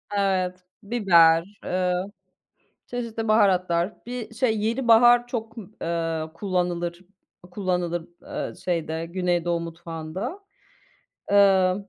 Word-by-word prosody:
Evet, 185 Hz, -2 st, 0 dB, 0.2 s
biber, 170 Hz, -7 st, +5 dB, 0.2 s
eee, 180 Hz, 0 st, 0 dB, 0.9 s
çeşitli 230 Hz, -2 st, -4 dB
baharatlar, 185 Hz, -3 st, +2 dB
bir, 240 Hz, -2 st, -6 dB
şey, 225 Hz, -3 st, +1 dB
yenibahar 240 Hz, +1 st, +4 dB
çok, 225 Hz, -2 st, -5 dB, 0.3 s
eee, 165 Hz, -1 st, -1 dB
kullanılır, 175 Hz, -2 st, -2 dB, 0.5 s
kullanılır, 180 Hz, -3 st, -2 dB
eee, -, -, -5 dB
şeyde 165 Hz, -2 st, -3 dB
Güneydoğu 175 Hz, -1 st, 0 dB
mutfağında. 170 Hz, -, -6 dB, 0.9 s
Eee, 190 Hz, -2 st, +5 dB
185 Hz, 85 wpm, -24 LUFS, 170-220 Hz, 0.9 s, biber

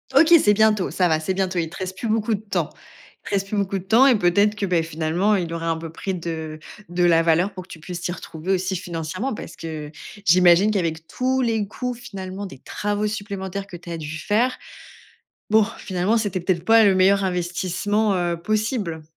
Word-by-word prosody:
OK, 330 Hz, +1 st, +7 dB
c'est 210 Hz, -, +5 dB
bientôt, 215 Hz, -3 st, +3 dB
ça 180 Hz, -2 st, +1 dB
va, 155 Hz, -1 st, +2 dB
c'est 185 Hz, +4 st, -2 dB
bientôt. 190 Hz, -2 st, 0 dB
Il 165 Hz, -1 st, -2 dB
te -, -, -10 dB
reste 185 Hz, 0 st, -5 dB
plus 230 Hz, -, -3 dB
beaucoup 220 Hz, 0 st, +1 dB
de 200 Hz, -, -8 dB
temps 215 Hz, -, -2 dB, 0.6 s
il -, -, -7 dB
te -, -, +2 dB
reste 195 Hz, 0 st, -1 dB
plus 210 Hz, -, -2 dB
beaucoup 195 Hz, -1 st, -1 dB
de -, -, -11 dB
temps 230 Hz, +8 st, +5 dB
et 245 Hz, -5 st, +5 dB
peut-être 200 Hz, +4 st, +3 dB
que, 205 Hz, -, -2 dB
beh, 175 Hz, -3 st, +2 dB
finalement, 165 Hz, +6 st, 0 dB
il 170 Hz, -3 st, -2 dB
aurait 165 Hz, 0 st, -4 dB
un 165 Hz, -1 st, +1 dB
peu 165 Hz, -1 st, -7 dB
pris 190 Hz, +3 st, -4 dB
de 160 Hz, -2 st, -5 dB, 0.3 s
de 175 Hz, +1 st, -1 dB
la 165 Hz, -1 st, +5 dB
valeur 170 Hz, +4 st, +2 dB
pour 185 Hz, -1 st, -7 dB
que -, -, -21 dB
tu 160 Hz, -, -11 dB
puisses 180 Hz, +1 st, -6 dB
t'y 175 Hz, 0 st, -3 dB
retrouver 175 Hz, +2 st, -4 dB
aussi 185 Hz, 0 st, -1 dB
financièrement. 175 Hz, +9 st, -4 dB
Parce -, -, -8 dB
que 155 Hz, -2 st, -6 dB, 0.3 s
j'imagine 180 Hz, +4 st, +5 dB
qu'avec 165 Hz, -5 st, -2 dB
tous 260 Hz, +6 st, -1 dB
les 225 Hz, -4 st, 0 dB
coûts, 250 Hz, +4 st, -4 dB
finalement, 195 Hz, -4 st, -7 dB
des 135 Hz, -9 st, -10 dB
travaux 210 Hz, 0 st, -2 dB
supplémentaires 200 Hz, -2 st, -5 dB
que 180 Hz, -, -10 dB
tu 175 Hz, 0 st, -11 dB
as 165 Hz, -, -3 dB
dû 155 Hz, 0 st, -6 dB
faire. 235 Hz, +8 st, +1 dB, 0.9 s
Bon, 220 Hz, -1 st, +6 dB
finalement, 190 Hz, +4 st, 0 dB
c'était 205 Hz, -4 st, -1 dB
peut 180 Hz, +2 st, +1 dB
être 170 Hz, +1 st, -9 dB
pas 225 Hz, 0 st, +6 dB
le 195 Hz, -2 st, +5 dB
meilleur 195 Hz, +1 st, +4 dB
investissement, 185 Hz, +3 st, 0 dB
heu, 175 Hz, -1 st, -1 dB
possible? 210 Hz, -6 st, -1 dB
185 Hz, 220 wpm, -22 LUFS, 170-210 Hz, 0.9 s, OK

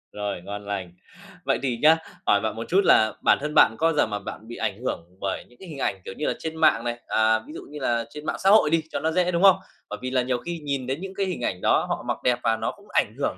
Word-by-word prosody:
Rồi, 105 Hz, -3 st, -3 dB
ngon 100 Hz, +3 st, -7 dB
lành. 100 Hz, -3 st, -4 dB, 0.5 s
Vậy -, -, +1 dB
thì 125 Hz, -3 st, 0 dB
nhá, 160 Hz, +2 st, +7 dB, 0.3 s
hỏi 100 Hz, -, +4 dB
bạn 110 Hz, 0 st, -2 dB
một 115 Hz, -, -4 dB
chút 195 Hz, +3 st, +4 dB
là 110 Hz, 0 st, +5 dB
bản -, -, +5 dB
thân 150 Hz, +1 st, -3 dB
bạn 110 Hz, -, +6 dB
có 165 Hz, -, +2 dB
bao 165 Hz, -, +2 dB
giờ 145 Hz, -, +3 dB
mà 105 Hz, -1 st, -3 dB
bạn 105 Hz, +2 st, -9 dB
bị 120 Hz, -, -8 dB
ảnh -, -, -2 dB
hưởng 85 Hz, -, -3 dB, 0.2 s
bởi 100 Hz, -1 st, -3 dB
những 120 Hz, -, -23 dB
cái 190 Hz, -, -11 dB
hình 150 Hz, -, -8 dB
ảnh, 95 Hz, -6 st, -1 dB
kiểu -, -, -6 dB
như 150 Hz, -, -2 dB
là, -, -, +1 dB
trên 160 Hz, 0 st, -5 dB
mạng 115 Hz, -, +4 dB
này, 120 Hz, 0 st, -3 dB
à, 110 Hz, 0 st, +3 dB
ví 155 Hz, -, -10 dB
dụ -, -, -7 dB
như 150 Hz, 0 st, -8 dB
là 120 Hz, -3 st, 0 dB
trên 150 Hz, +3 st, -10 dB
mạng -, -, -1 dB
xã 195 Hz, -, +5 dB
hội 210 Hz, -7 st, +6 dB
đi 165 Hz, 0 st, +2 dB
cho -, -, -2 dB
nó 160 Hz, -, 0 dB
dễ, 180 Hz, +1 st, +1 dB
đúng 170 Hz, +2 st, 0 dB
không? 195 Hz, -2 st, +8 dB, 0.3 s
Bởi -, -, -6 dB
vì 130 Hz, 0 st, -4 dB
là 130 Hz, -1 st, +2 dB
nhiều 125 Hz, 0 st, 0 dB
khi 170 Hz, +4 st, -5 dB
nhìn 140 Hz, -4 st, -3 dB
đến 135 Hz, +5 st, -3 dB
những 195 Hz, 0 st, -6 dB
cái 200 Hz, 0 st, 0 dB
hình 180 Hz, -9 st, -4 dB
ảnh 90 Hz, -6 st, -2 dB
đó, -, -, +3 dB
họ -, -, -2 dB
mặc -, -, -1 dB
đẹp 125 Hz, -1 st, +2 dB
và 115 Hz, 0 st, +2 dB
nó -, -, -2 dB
cũng -, -, -19 dB
ảnh -, -, +1 dB
hưởng -, -, -2 dB
130 Hz, 305 wpm, -25 LUFS, 110-160 Hz, 0.5 s, không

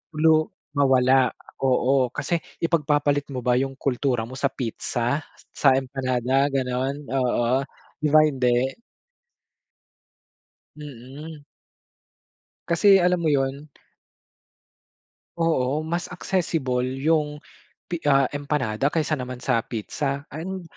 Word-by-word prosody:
lu 155 Hz, 0 st, +4 dB, 0.3 s
mawala 130 Hz, -2 st, +4 dB, 0.3 s
oo. 130 Hz, 0 st, +2 dB
Kasi 170 Hz, +4 st, -1 dB, 0.2 s
ipagpapalit 145 Hz, -3 st, +1 dB
mo -, -, -1 dB
ba 125 Hz, 0 st, +3 dB
yung 135 Hz, 0 st, -2 dB
kultura 130 Hz, -3 st, 0 dB
mo -, -, -12 dB
sa 135 Hz, +2 st, +1 dB
pizza, 120 Hz, +2 st, -2 dB, 0.3 s
sa 140 Hz, -, +4 dB
empanada 130 Hz, 0 st, 0 dB
ganon? 135 Hz, +2 st, -1 dB
Oo, 125 Hz, 0 st, +1 dB, 0.4 s
'di 155 Hz, -, 0 dB
ba 155 Hz, 0 st, +7 dB
hindi? 130 Hz, -3 st, +1 dB, 2.0 s
Mm. 145 Hz, +2 st, -10 dB, 1.2 s
Kasi 195 Hz, +4 st, +5 dB
alam 180 Hz, -1 st, +2 dB
mo 160 Hz, -, +1 dB
'yun. 140 Hz, +1 st, -1 dB, 1.7 s
Oo, 155 Hz, -3 st, +1 dB
mas 170 Hz, +2 st, -3 dB
accessible 160 Hz, -9 st, -1 dB
yung 150 Hz, +1 st, 0 dB, 0.5 s
pi 170 Hz, -, -2 dB
ah, 135 Hz, -1 st, +5 dB
empanada 140 Hz, -4 st, -1 dB
kaysa 155 Hz, -1 st, 0 dB
naman 125 Hz, 0 st, -6 dB
sa 125 Hz, -4 st, +2 dB
pizza. 135 Hz, +5 st, -3 dB
And, 180 Hz, +5 st, -5 dB
140 Hz, 105 wpm, -24 LUFS, 130-155 Hz, 2.0 s, ba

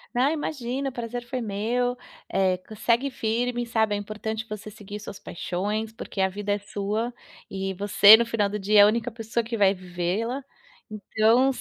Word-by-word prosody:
Ah, 260 Hz, +4 st, +3 dB
imagina, 275 Hz, -3 st, -3 dB
o -, -, -10 dB
prazer 240 Hz, 0 st, -5 dB
foi 255 Hz, +1 st, -4 dB
meu, 235 Hz, +3 st, -1 dB, 0.4 s
eh, 185 Hz, -1 st, +2 dB, 0.2 s
segue 240 Hz, +5 st, +1 dB
firme, 240 Hz, +2 st, -1 dB
sabe, 220 Hz, -2 st, +1 dB
é 205 Hz, -, 0 dB
importante 215 Hz, +1 st, -4 dB
você 215 Hz, 0 st, -7 dB
seguir 210 Hz, 0 st, -9 dB
suas 200 Hz, -1 st, -9 dB
paixões, 210 Hz, +6 st, -3 dB
porque 215 Hz, -, -8 dB
a 190 Hz, -, +4 dB
vida 205 Hz, +2 st, -4 dB
é 205 Hz, -, 0 dB
sua, 205 Hz, +4 st, -3 dB, 0.3 s
e 195 Hz, 0 st, -4 dB
você 205 Hz, +2 st, +8 dB
no 235 Hz, -, +1 dB
final 210 Hz, -3 st, 0 dB
do 210 Hz, -, -3 dB
dia 210 Hz, +1 st, +3 dB
é -, -, +11 dB
a -, -, +8 dB
única 230 Hz, +2 st, 0 dB
pessoa 225 Hz, +1 st, -2 dB
que 230 Hz, +1 st, -4 dB
vai 200 Hz, -3 st, +5 dB
vivê-la. 185 Hz, +8 st, -3 dB, 0.5 s
Então, 220 Hz, +5 st, +2 dB
220 Hz, 180 wpm, -25 LUFS, 205-240 Hz, 0.5 s, é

